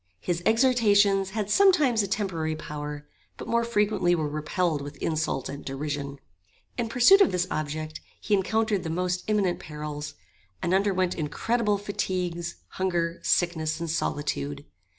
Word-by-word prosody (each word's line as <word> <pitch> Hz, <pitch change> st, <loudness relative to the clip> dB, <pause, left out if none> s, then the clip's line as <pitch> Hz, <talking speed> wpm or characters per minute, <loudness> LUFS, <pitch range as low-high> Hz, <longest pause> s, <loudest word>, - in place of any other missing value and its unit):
His 170 Hz, -, -2 dB
exhortations 210 Hz, -5 st, +4 dB
had 210 Hz, 0 st, -3 dB
sometimes 305 Hz, -, +5 dB
a 200 Hz, -, -2 dB
temporary 170 Hz, -6 st, -2 dB
power, 150 Hz, -1 st, -6 dB, 0.3 s
but -, -, -8 dB
more 235 Hz, 0 st, +2 dB
frequently 210 Hz, -6 st, +2 dB
were 155 Hz, -3 st, -1 dB
repelled 155 Hz, +1 st, -1 dB
with 145 Hz, 0 st, -8 dB
insult 155 Hz, -4 st, -1 dB
and 140 Hz, -, -7 dB
derision. 140 Hz, 0 st, -4 dB, 0.6 s
In 235 Hz, -2 st, -2 dB
pursuit 255 Hz, -, +6 dB
of 390 Hz, -, +5 dB
this 180 Hz, 0 st, +1 dB
object 155 Hz, +1 st, -4 dB, 0.2 s
he 210 Hz, -, -2 dB
encountered 210 Hz, +1 st, +1 dB
the 160 Hz, -, -4 dB
most 180 Hz, +2 st, -1 dB
imminent 205 Hz, -4 st, +1 dB
perils, 150 Hz, -1 st, -6 dB, 0.4 s
and 175 Hz, -, -1 dB
underwent 190 Hz, -2 st, +2 dB
incredible 210 Hz, +7 st, 0 dB
fatigues, 180 Hz, -4 st, -3 dB
hunger, 170 Hz, -3 st, -1 dB
sickness, 160 Hz, -2 st, +1 dB
and 165 Hz, -1 st, -3 dB
solitude. 145 Hz, -2 st, -2 dB
175 Hz, 140 wpm, -26 LUFS, 155-210 Hz, 0.6 s, pursuit